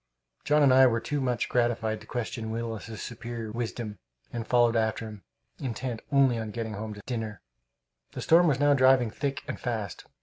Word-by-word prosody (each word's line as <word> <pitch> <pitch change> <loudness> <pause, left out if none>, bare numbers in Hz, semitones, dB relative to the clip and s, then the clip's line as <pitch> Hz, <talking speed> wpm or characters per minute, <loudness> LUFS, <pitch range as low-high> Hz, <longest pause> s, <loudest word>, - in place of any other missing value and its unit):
John 150 0 +4
and 135 -2 +6
I 130 0 +8
were 115 -1 +1
too 145 +4 -2
much 125 -2 0
gratified 120 -3 0
to - - -14
question 115 -2 -4
Willis's 115 -1 -5
superior 115 -1 -6
wisdom 115 -2 -4 0.3
and 115 -2 -4
followed 120 -1 +4
after 110 0 0
him, 105 -2 -10 0.4
intent 125 -3 -4
only 135 -4 +4
on 110 -1 -4
getting 110 0 -4
home 105 +1 -5
to 105 - -11
dinner. 110 - -4 0.7
The - - -5
storm 170 +2 +6
was 140 -4 +2
now 145 0 +5
driving 130 -4 +4
thick 140 +3 -3
and - - -4
fast. 110 -8 -4
120 Hz, 180 wpm, -28 LUFS, 110-130 Hz, 0.7 s, I